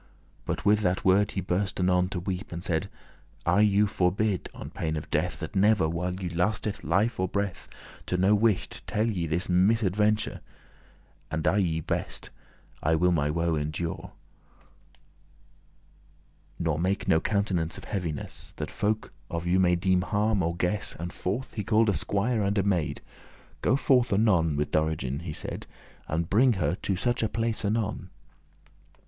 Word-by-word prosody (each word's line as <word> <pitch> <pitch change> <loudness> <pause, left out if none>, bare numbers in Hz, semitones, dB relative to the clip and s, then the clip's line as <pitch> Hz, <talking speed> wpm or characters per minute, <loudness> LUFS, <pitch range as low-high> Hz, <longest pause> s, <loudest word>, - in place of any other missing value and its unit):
But - - -3
with 105 +1 +5
that 90 -3 0
word 100 +2 +4
he 95 - -1
burst 95 +2 -1
anon 90 0 +2
to 90 - -3
weep, 90 +1 -4
And 85 0 -5
said; 95 +1 0 0.6
"I 90 +4 +3
you 105 0 +4
forbid, 100 +1 0
on - - -9
pain 80 -1 -2
of 75 - -6
death, - - 0
That - - -6
never, 100 -3 +4
while 90 +2 -2
you 95 -1 -4
lasteth 105 +4 -1
life 110 +4 +1
or 95 - +1
breath, 100 -1 -3 0.4
To 90 - 0
no 95 +3 +4
wight 105 -1 +1
tell 110 +2 0
ye 90 -7 -1
this 85 +3 0
misaventure; 105 +2 +2 0.9
As 80 - -2
I 100 - +3
may 80 -4 0
best, - - -3 0.5
I 80 +1 +2
will 90 +3 +3
my 75 -4 +1
woe 85 +2 0
endure, 80 +2 -3 2.4
Nor 80 -3 -1
make 95 +4 0
no 80 - +4
countenance 95 -6 0
of - - -9
heaviness, 85 -7 -5
That - - -4
folk 110 +1 -1 0.2
of 85 0 -3
you 90 +2 +3
may 90 -1 +4
deeme 90 +1 +2
harm, 105 +3 +1
or 85 0 -1
guess." 90 +4 0
And 85 +1 -5
forth 105 +8 -3
he 105 - -3
call'd 110 +2 +3
a - - +3
squier 100 +7 0
and 100 +1 0
a 100 - +3
maid. 90 -6 0 0.6
"Go - - +3
forth 130 -3 +3
anon 95 -7 +3
with 75 +1 -1
Dorigen," 75 -4 0
he 85 -2 -6
said, - - -6 0.4
"And 80 +2 -1
bringe 120 +5 +4
her 95 - 0
to 95 +1 -2
such 120 +6 0
a 110 - +1
place 115 -1 -1
anon." 105 -3 -1
95 Hz, 165 wpm, -27 LUFS, 85-105 Hz, 2.4 s, with